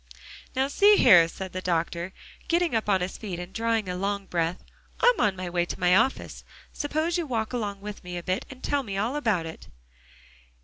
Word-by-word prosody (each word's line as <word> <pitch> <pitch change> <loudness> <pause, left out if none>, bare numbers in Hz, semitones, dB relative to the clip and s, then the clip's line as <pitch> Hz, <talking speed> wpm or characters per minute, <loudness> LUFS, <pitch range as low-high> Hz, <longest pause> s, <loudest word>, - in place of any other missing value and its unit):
"Now 265 +1 +2
see 405 +9 +5
here," 170 -4 +7
said 190 +2 -7
the 185 - -3
doctor, 170 0 -1 0.4
getting 340 -2 +1
up 220 -2 0
on 190 -2 +3
his 180 +1 -4
feet 195 -6 -5
and 175 +2 -8
drawing 225 -2 0
a 180 - -3
long 200 +1 -2
breath. 170 0 -2 0.4
"I'm - - +4
on 200 -2 +2
my 185 -1 -5
way 175 0 0
to - - -6
my 180 0 +4
office; 235 +6 0 0.3
suppose 315 +4 -1
you 335 - -3
walk 225 -2 -2
along 205 -5 -3
with 210 0 -8
me 180 0 -6
a 175 - -6
bit 185 +2 -1
and 260 -1 -12
tell 285 -1 +1
me 200 -6 -5
all 225 +7 -1
about 220 - 0
it." 160 - -9
200 Hz, 210 wpm, -26 LUFS, 180-255 Hz, 0.4 s, here